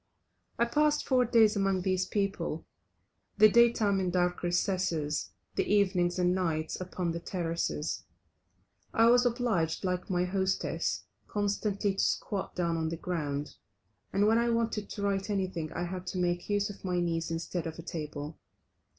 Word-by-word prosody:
I 235 - +3
passed 300 +4 +2
four 255 -2 +4
days 225 -2 +5
among 195 -2 +1
these 185 -1 +1
people, 195 -6 -2 0.7
the 215 +1 +9
day 235 +2 +6
time 205 -4 +1
in 185 -1 0
dark 180 0 +1
recesses, 175 -4 0 0.2
the - - +1
evenings 185 -3 +2
and 180 0 +3
nights 165 -3 -1
upon 180 -1 -2
the 170 - -3
terraces. 170 -3 -2 0.9
I 225 -1 +6
was 245 0 +5
obliged, 220 -10 0
like 180 +1 -2
my 180 -1 +1
hostess, 190 +1 -1 0.2
constantly 205 -1 0
to - - +2
squat 200 -3 -1
down 170 -2 0
on 160 0 -1
the 165 - -4
ground, 150 -5 -3 0.6
and 200 +1 +2
when 225 +2 +4
I 235 0 +2
wanted 230 -3 0
to 200 - -5
write 200 0 0
anything 185 -6 -2
I 175 - -3
had 180 +1 -5
to 180 - -3
make 175 0 -1
use 205 0 +1
of 200 - -14
my 180 -2 0
knees 165 -1 -1
instead 165 +1 -3
of 160 - -6
a 165 - -8
table. 150 -2 -6
185 Hz, 165 wpm, -30 LUFS, 170-205 Hz, 0.9 s, the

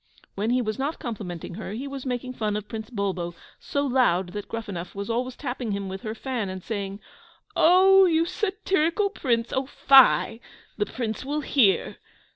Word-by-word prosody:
When 210 +3 -2
he 250 +1 +2
was 215 +2 -3
not 285 +4 -1
complimenting 190 -8 -6
her, 205 +1 -6
he 255 +6 -5
was 275 -1 -6
making 255 0 -3
fun 215 -3 -1
of 210 0 -6
Prince 220 -1 -6
Bulbo, 190 -6 -3 0.2
so 285 0 -2
loud 240 -9 +2
that 205 -1 -5
Gruffanuff 200 -6 -6
was 200 +3 -3
always 250 +2 -2
tapping 245 -6 -4
him 200 -1 -3
with 190 0 -6
her 220 -2 -5
fan 240 -5 -3
and 185 -1 -6
saying, 200 -2 -4 0.6
"Oh, 380 +3 +7
you 330 -2 +3
satirical 385 -1 0
Prince! 235 - -1
Oh, 265 0 -1
fie 270 -4 +5 0.4
the 210 - -1
Prince 225 -3 -4
will 295 +3 -2
hear!" 250 -8 +2
235 Hz, 175 wpm, -25 LUFS, 205-275 Hz, 0.6 s, Oh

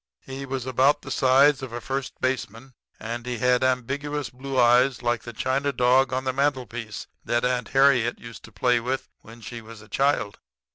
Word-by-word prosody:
"He 135 +1 -7
was 130 -2 -4
about 130 +3 +2
the - - -8
size 135 +2 +4
of 130 -3 -6
a 120 - -5
first 135 +2 -5
baseman; 130 0 -3 0.3
and 115 +2 -5
he 125 0 -4
had 125 +2 +2
ambiguous 140 +1 -1
blue 130 +1 -3
eyes 125 +2 +4
like 120 -1 0
the 120 - -8
china 130 +5 -1
dog 125 +1 +3
on 130 0 -1
the 130 -1 -1
mantelpiece 125 -6 -2 0.2
that 120 +1 0
Aunt 125 -2 0
Harriet 135 -3 +3
used 115 -1 -11
to 110 - -15
play 120 +4 +2
with 130 +3 -3
when 115 +1 -14
she 115 +2 -8
was 115 0 -12
a 110 - -15
child. 135 -3 0
125 Hz, 190 wpm, -25 LUFS, 120-135 Hz, 0.3 s, size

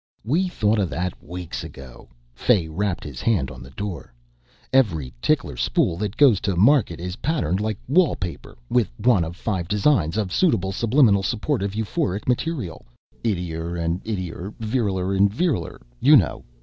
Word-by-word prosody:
"We 165 +11 +1
thought 110 -10 +1
of 95 -4 0
that 90 +1 -4
weeks 90 0 -6
ago," 65 -2 -11 0.2
Fay 90 - +2
rapped, 95 +3 -2
his 70 -5 -7
hand 85 - +1
on 65 -1 -10
the 60 - -11
door. 90 +3 -6 0.6
"Every 85 - +2
tickler - - +1
spool - - +1
that 105 +2 -3
goes 130 -9 +6
to 100 -3 -1
market 105 - +3
is 90 +2 -5
patterned 120 - 0
like 110 -1 -2
wallpaper 140 - 0
with 120 - +2
one 110 -4 +3
of 85 +1 -6
five 95 -3 -2
designs 105 - +2
of 100 -4 -1
suitable 95 - +2
subliminal 115 -1 +3
supportive 105 -1 -1
euphoric 110 - -2
material. 125 - -2 0.4
'Ittier 85 -5 -2
and 85 +2 -1
ittier,' 95 -2 -5
'viriler 105 -5 -1
and 100 +1 +4
viriler' 135 - -1 0.2
you 150 - +7
know. 95 - 0
100 Hz, 155 wpm, -23 LUFS, 85-115 Hz, 0.6 s, you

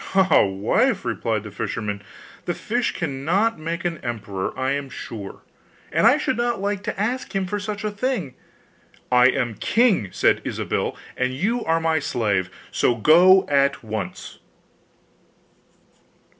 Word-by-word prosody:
'Ah, 190 -1 +5
wife!' 110 - +1
replied 110 -3 -1
the 105 - -9
fisherman, 105 -1 -4 0.4
'the 175 - -2
fish 240 +2 -1
cannot 170 +7 0
make 165 +2 -4
an 170 -2 -2
emperor, 105 -5 -4
I 130 +1 0
am 140 -1 -2
sure, 105 -6 -8 0.5
and - - +4
I - - +6
should - - -1
not 240 -2 0
like 200 0 -2
to - - -4
ask 240 +2 -2
him 195 -1 +1
for 205 +3 -3
such 205 +1 -5
a 215 - -1
thing.' 205 - -2 0.8
'I 125 0 +6
am 120 -2 0
king,' 205 - +2
said - - +2
Ilsabill, - - -2 0.2
'and 125 0 -1
you 225 - 0
are 165 0 +2
my 160 -1 +1
slave; 100 -9 -1 0.2
so 120 - +2
go 175 - +6
at 140 -2 +2
once! 105 -5 -6
155 Hz, 145 wpm, -23 LUFS, -, 0.8 s, I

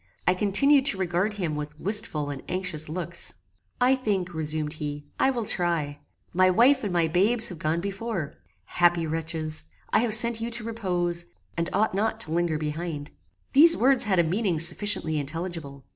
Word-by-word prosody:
I 180 - +4
continued 260 +9 +3
to 240 - +2
regard 185 +3 -1
him 170 -7 -3
with 150 0 -7
wistful 180 -7 -2
and 135 -2 -7
anxious 180 -5 -3
looks. 170 - -3 0.4
"I 255 +2 +4
think," 195 -8 -2
resumed 155 -1 -1
he, 145 0 -5
"I 265 - +3
will 240 -4 -2
try. 165 -7 0 0.3
My 185 +1 +4
wife 250 +8 +4
and 205 - -2
my 170 -2 +1
babes 205 +8 +2
have 175 -5 -9
gone 160 +2 -1
before. 195 -4 -4 0.3
Happy 175 +4 +2
wretches! 160 - -3 0.3
I - - +5
have 225 -2 +3
sent 235 0 +7
you 230 - -3
to 235 -1 -4
repose, 180 -6 -2 0.3
and 170 0 -2
ought 215 -1 +1
not 215 +3 -1
to 155 - 0
linger 170 -1 0
behind." 155 -1 -5 0.4
These 320 +5 +8
words 260 0 +3
had 195 -3 +1
a 170 - +4
meaning 180 +1 -1
sufficiently 165 -1 +1
intelligible. 155 -2 -6
175 Hz, 175 wpm, -25 LUFS, 155-215 Hz, 0.4 s, These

